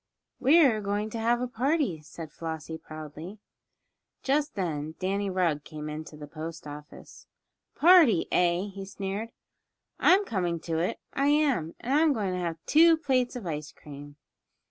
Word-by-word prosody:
"We're 275 -7 +5
going 205 +2 -2
to 230 - -4
have 235 +2 +1
a 250 - -1
party," 250 - 0
said 160 0 -10
Flossie, 160 0 -6
proudly. 155 +4 -9 0.9
Just 290 +2 0
then 160 -5 -3
Danny 195 +2 -1
Rugg 170 -6 0
came 150 -1 -7
into 155 0 -7
the 150 - -8
post 160 +2 -8
office. 150 +1 -11 0.5
"A - - -30
party; 325 - +6
eh?" 180 +3 +2
he 195 0 -7
sneered. 195 +3 -5 0.7
"I'm 395 +3 +5
coming 175 - -1
to 165 -1 -2
it, 175 - -1
I 275 +1 +1
am; 285 - +1
and 255 - -2
I'm 305 0 +4
going 200 -6 -2
to 180 - -2
have 170 -2 -3
two 325 +1 +6
plates 260 -5 0
of 240 -6 -6
ice 150 -2 -4
cream." 145 0 -12
190 Hz, 160 wpm, -28 LUFS, 160-250 Hz, 0.9 s, party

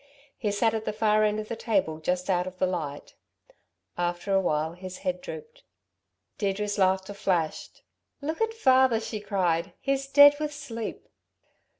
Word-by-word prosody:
He 215 - -2
sat 220 +2 +2
at 220 -1 -3
the - - -2
far 215 0 +3
end 210 0 +1
of 215 - -5
the 230 - -4
table 190 -9 0
just 180 +3 -1
out 180 -2 +1
of 185 0 -8
the 185 - +2
light: 155 -6 -4 0.9
after 175 +3 -1
a 195 - +4
while 155 -2 0
his 185 +1 -8
head 180 -1 -1
drooped. 470 +1 -9 0.8
Deirdre's 205 +1 -1
laughter 190 +1 +2
flashed. 175 -5 -2 0.4
"Look 315 +6 -4
at 450 0 +2
father," 260 - +4
she 220 -1 -5
cried, 185 -5 0
"he's 275 0 -1
dead 285 +1 +8
with 300 -1 -3
sleep!" 230 -6 -6
205 Hz, 165 wpm, -27 LUFS, 180-240 Hz, 0.9 s, dead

